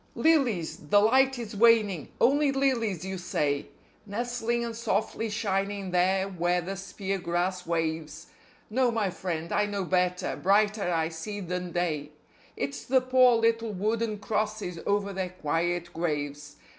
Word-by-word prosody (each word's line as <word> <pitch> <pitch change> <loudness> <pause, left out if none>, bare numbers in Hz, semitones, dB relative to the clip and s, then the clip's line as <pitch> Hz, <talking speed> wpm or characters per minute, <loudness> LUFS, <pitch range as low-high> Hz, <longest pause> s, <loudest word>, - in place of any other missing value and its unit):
LILIES 255 - +2
(the 205 - +6
light 265 +5 +4
is 225 -3 -6
waning), 210 - +4
only 285 +2 +4
lilies 230 - 0
you 190 -1 -4
say, 145 -4 -1 0.4
Nestling 235 +2 -1
and 230 -1 -5
softly 225 0 -1
shining 200 -2 -2
there 190 +2 +2
where 180 -1 0
the 185 +3 -4
spear 195 0 -4
grass 180 +1 -2
waves. 160 -1 -2 0.5
No, 255 +2 +3
my 220 -5 0
friend, 170 -2 -4
I 210 0 +2
know 200 -2 -2
better; 180 0 0
brighter 205 -1 +2
I 165 -1 +1
see 170 +6 -6
than 180 -1 -4
day: 155 -4 -2 0.4
It's 140 0 -3
the 260 +1 +3
poor 255 -1 +5
little 230 -1 +1
wooden 215 +3 -1
crosses 210 -4 -2
over 200 0 +1
their 190 -1 -2
quiet 175 +1 -2
graves. 145 -3 -3
195 Hz, 145 wpm, -28 LUFS, 175-225 Hz, 0.5 s, the